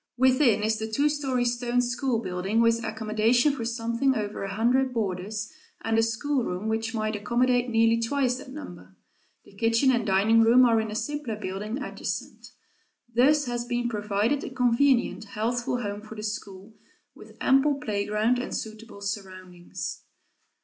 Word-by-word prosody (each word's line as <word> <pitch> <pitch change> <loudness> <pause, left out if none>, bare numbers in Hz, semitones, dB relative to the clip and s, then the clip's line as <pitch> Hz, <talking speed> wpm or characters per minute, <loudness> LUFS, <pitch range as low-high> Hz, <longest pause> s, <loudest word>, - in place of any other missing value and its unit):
Within 255 -4 +4
is 215 0 +1
the 220 0 -4
two 285 +6 +2
story 270 -4 -1
stone 240 0 0
school 245 0 0
building, 185 +4 -1
with 230 0 +3
accommodation 220 +5 +2
for 245 - -4
something 235 +3 0
over 210 -2 -3
a 195 - -4
hundred 250 +3 +2
boarders, 210 +1 -3 0.3
and 225 0 0
a 225 - +4
schoolroom 225 -4 -1
which 225 +1 -2
might 215 0 -1
accommodate 245 +4 +1
nearly 225 0 +3
twice 250 +1 0
that 260 - -11
number. 180 - -10 0.5
The - - -18
kitchen 230 +5 +3
and 240 -2 +1
dining 215 +3 +4
room 240 +3 +6
are 230 -2 +3
in 220 - -4
a 210 - -5
simpler 290 -2 -3
building 210 +6 -4
adjacent. - - -6 0.6
Thus 285 +5 +4
has 240 -1 -2
been 240 0 -1
provided 210 +5 0
a - - -5
convenient, 250 -2 +2
healthful 240 +4 -2
home 205 0 -4
for 220 +1 -11
the 215 - -7
school, 205 -1 -6 0.4
with - - -15
ample 270 +2 +3
playground 215 -1 0
and 245 - -4
suitable 220 -1 -7
surroundings. 185 -3 -6
230 Hz, 155 wpm, -26 LUFS, 215-250 Hz, 0.6 s, room